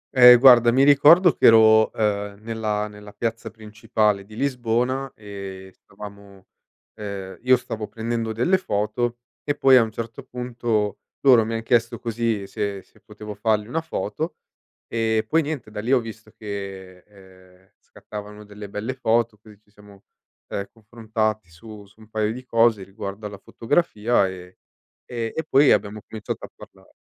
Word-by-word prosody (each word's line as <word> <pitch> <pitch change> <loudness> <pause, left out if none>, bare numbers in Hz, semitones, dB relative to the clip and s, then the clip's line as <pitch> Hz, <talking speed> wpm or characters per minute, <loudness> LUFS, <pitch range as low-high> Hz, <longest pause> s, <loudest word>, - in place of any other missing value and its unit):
Ehm, 125 -1 +9
guarda, 120 -2 +7
mi 135 +3 +3
ricordo 150 +4 +6
che - - +4
ero, 110 -1 +6
uhm, 100 -2 -2
nella 110 -2 -2
nella 105 0 -13
piazza 115 +1 -4
principale 105 -2 -1
di 105 +1 -14
Lisbona 125 +1 -1
e 100 -2 -9
stavamo 100 -1 -13 0.5
uhm, 100 -2 -7
io 125 0 +4
stavo 110 -3 -6
prendendo 115 0 -3
delle 175 - +1
foto 120 - -2 0.3
e 145 - -1
poi 135 -1 +5
a 125 - +7
un 110 - -1
certo 115 +4 -7
punto 120 -5 -3 0.2
loro 125 -5 +6
mi 115 0 -3
han 115 - -4
chiesto 115 -1 +1
così 115 -3 -2
se 100 -1 -4
se - - -26
potevo 105 0 -10
fargli 105 +1 0
una 160 +6 -2
foto. 155 - -4 0.5
Ehm, 110 -1 0
poi 165 +1 +2
niente, 145 -8 -5
da 105 - -5
lì 120 +4 -3
ho 130 - +5
visto 110 -1 -10
che, 95 -3 -8
ehm, 95 -2 -20
scattavano 105 0 -10
delle 105 0 -10
belle 110 +6 -4
foto, 115 -3 0
così 105 -1 -17
ci 105 -1 -34
siamo, 105 -1 -18 0.5
ehm, 100 0 -4
confrontati 110 -3 -3
su 105 +4 -13
su 110 - -25
un 110 - -17
paio 110 0 -1
di 125 +1 -10
cose 115 -4 +2
riguardo 100 +1 -8
alla 100 -1 -10
fotografia 115 - 0
e 90 -1 -10 0.5
e 115 -2 -4
e 160 - -2
poi 140 +1 +4
abbiamo 105 +1 0
cominciato 110 -2 -6
a - - -14
parlare. - - -17
110 Hz, 160 wpm, -23 LUFS, 105-120 Hz, 0.5 s, Ehm